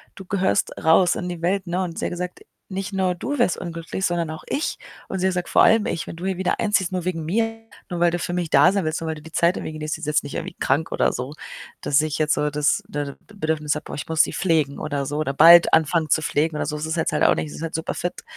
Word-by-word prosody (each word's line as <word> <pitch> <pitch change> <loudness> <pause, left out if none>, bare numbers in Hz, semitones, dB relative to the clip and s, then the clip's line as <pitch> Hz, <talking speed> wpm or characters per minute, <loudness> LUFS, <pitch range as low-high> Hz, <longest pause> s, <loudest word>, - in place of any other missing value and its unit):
du 190 - -10
gehörst 190 +1 0
raus 175 +3 +5
in 180 - -4
die 175 -2 -6
Welt." 190 +2 0
Ne? 180 +2 -1
Und 170 -2 -6
sie - - -2
hat - - -2
gesagt: 180 0 -5 0.3
„Nicht 195 0 -4
nur 190 -2 0
du 280 +11 -4
wärst 175 - +2
unglücklich, 170 +2 -4
sondern 170 -2 -1
auch 155 - -8
ich.“ 300 - -2 0.3
Und 190 - -4
sie 190 +1 +2
sagt: 180 -1 -2
„Vor - - +5
allem 220 -1 +5
ich, 165 - -3
wenn - - -7
du 175 - -6
hier 190 -1 -1
wieder 185 -1 -1
einziehst, 200 -4 +1
nur 180 -2 -3
wegen 170 -3 -2
mir, 225 +7 -1 0.3
nur 175 -2 -4
weil 175 0 +4
du 175 - -2
für 175 - -3
mich 175 -3 -2
da 145 +7 +5
sein 200 -2 0
willst 155 +1 -2
und 165 - -4
weil 160 - -2
du 150 - -11
die 160 +2 -13
Zeit 170 +3 +2
irgendwie - - -5
genießt.“ 155 0 -4
Sie 160 - -10
ist 155 - -5
jetzt 150 0 +2
nicht 145 - -7
irgendwie - - -5
krank 145 +5 0
oder - - +1
so, 130 +3 -5 0.5
dass 140 +1 +3
ich 155 -1 -2
jetzt 155 -1 +2
so 150 - 0
das, 150 +7 +1
ne, 145 -6 -4 0.2
Bedürfnis 155 -6 -1
habe: 150 - -5
„Boah, - - -7
ich 140 - -6
muss 160 -1 +4
sie - - -3
pflegen“, 155 -6 +1
oder 145 -2 -2
so 145 +2 -3
„Oder 140 -3 -1
bald 170 +4 +8
anfangen 160 0 +3
zu 155 - +3
pflegen“ 155 +1 0
oder - - -1
so. 150 - -3
Das 150 +1 -3
ist 160 +1 -2
jetzt 160 - 0
halt 150 - +1
auch - - +5
nicht. - - -3
Sie - - -9
ist - - -8
halt 165 -1 -4
super 160 +1 -2
fit. 175 - -4
165 Hz, 290 wpm, -23 LUFS, 155-180 Hz, 0.5 s, bald